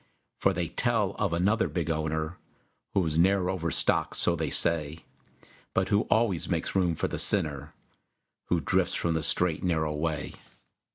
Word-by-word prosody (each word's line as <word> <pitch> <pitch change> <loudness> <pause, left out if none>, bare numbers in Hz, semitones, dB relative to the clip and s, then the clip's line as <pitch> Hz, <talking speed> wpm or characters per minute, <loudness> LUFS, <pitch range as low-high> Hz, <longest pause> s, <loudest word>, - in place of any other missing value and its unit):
For 95 - +3
they 90 -2 -2
tell 115 -5 +1
of 100 -4 0
another 100 +7 +1
big 85 -2 -2
owner 80 +2 -3 0.6
Whose 80 -5 +1
ne'er 95 +1 +3
overstocked, 85 -3 0
so - - +3
they - - -2
say, 80 -1 +1 0.7
But - - +1
who 100 +1 +1
always 110 -7 +1
makes - - -2
room 90 -3 +1
for - - -1
the - - -4
sinner 75 -7 0 0.7
Who 85 -2 0
drifts - - 0
from 85 - 0
the 80 - -1
straight, 85 +1 +1
narrow 80 -4 0
way. 75 -1 -3
85 Hz, 155 wpm, -28 LUFS, 80-95 Hz, 0.7 s, For